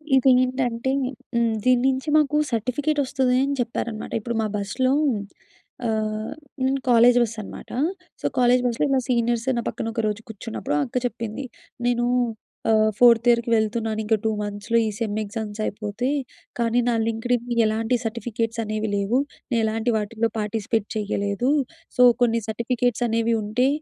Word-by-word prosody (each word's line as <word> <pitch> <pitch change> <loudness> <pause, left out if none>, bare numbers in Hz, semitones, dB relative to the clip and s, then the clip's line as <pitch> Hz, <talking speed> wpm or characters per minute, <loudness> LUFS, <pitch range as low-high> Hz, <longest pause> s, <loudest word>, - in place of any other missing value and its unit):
ఇదేంటంటే 255 -1 +2 0.4
హ్మ్. 235 -1 +2
దీని 250 -1 +4
నుంచి 265 +3 -2
మాకు 300 0 +2
సర్టిఫికేటొస్తుంది 260 +2 0
అని 280 +1 0
చెప్పారనమాట. 235 -2 -4
ఇప్పుడు 235 +1 -3
మా - - 0
బస్సులో 255 +6 0 0.9
ఆహ్, 215 -1 -1 0.3
నేను 270 +1 +1
కాలేజ్ 240 +1 +6
బస్సనమాట. 225 -3 -4 0.5
సో, - - -6
కాలేజ్ 250 0 +4
బస్సులో 240 +3 +1
ఇలా 270 -1 +3
సీనియర్స్ 235 -1 +1
నా - - +1
పక్కన 225 - -3
ఒకరోజు 215 -2 -1
కూర్చున్నప్పుడు 220 -7 -4
అక్క 250 - -4
చెప్పింది. 235 +2 -4 0.4
"నేను 240 0 +2 0.7
ఆహ్, 215 0 +4
ఫోర్త్ 235 -1 +6
ఇయర్‌కి 235 0 +3
వెళ్తున్నాను 220 0 0
ఇంకా, 220 +1 +2
2 - - +3
మంత్స్‌లో 205 +3 -1
ఈ - - 0
సెమ్ 215 -2 -2
ఎగ్జామ్స్ 210 0 -6
అయిపోతే. 210 +4 -3 0.5
కానీ, 235 +1 +2
నా - - +2
లింక్డ్ఇన్ 230 +1 0 0.2
ఎలాంటి 225 +3 +1
సర్టిఫికేట్సనేవి 225 -1 -2
లేవు. 200 +5 +1 0.3
నేను 235 - +2
ఎలాంటి 225 +2 0
వాటిలో 220 +2 -1
పార్టిసిపేట్ 215 0 -1
చేయలేదు. 205 +3 -1 0.5
సో, - - +4 0.2
కొన్ని 230 -1 +2
సర్టిఫికేట్సనేవి 235 0 0
ఉంటే, 230 +5 +1
230 Hz, 135 wpm, -23 LUFS, 215-245 Hz, 0.9 s, కాలేజ్